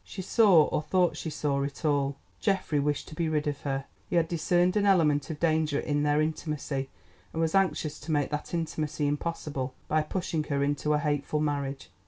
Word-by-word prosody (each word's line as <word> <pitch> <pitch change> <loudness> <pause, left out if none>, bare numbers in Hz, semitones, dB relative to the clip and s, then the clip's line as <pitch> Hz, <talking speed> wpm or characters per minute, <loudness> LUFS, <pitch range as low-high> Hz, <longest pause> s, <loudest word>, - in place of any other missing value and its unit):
She 190 - -7
saw, 190 -6 +6
or 150 - -1
thought 175 +1 +2
she 160 - -4
saw, 145 -2 -1
it 140 +3 -4
all. 140 -2 +1 0.2
Geoffrey 190 -7 +1
wished 145 0 -1
to - - -10
be 160 +1 -1
rid 150 -1 0
of 145 -1 -2
her. 135 -1 -2 0.2
He - - -1
had 165 -1 +3
discerned 175 +2 +2
an 205 -1 +3
element 150 -7 +3
of 155 -2 -5
danger 155 -3 +2
in 145 -1 0
their 150 0 +2
intimacy, 150 -3 -3 0.4
and 160 - -4
was 160 -1 +1
anxious 185 -6 +1
to 165 - -6
make 145 -2 +1
that 150 0 -3
intimacy 155 -3 -2
impossible 145 -3 -2
by 155 0 +2
pushing 160 -1 -2
her 140 -2 0
into 145 +1 0
a - - +3
hateful 145 0 -1
marriage. 140 -2 -2
150 Hz, 200 wpm, -28 LUFS, 145-165 Hz, 0.4 s, saw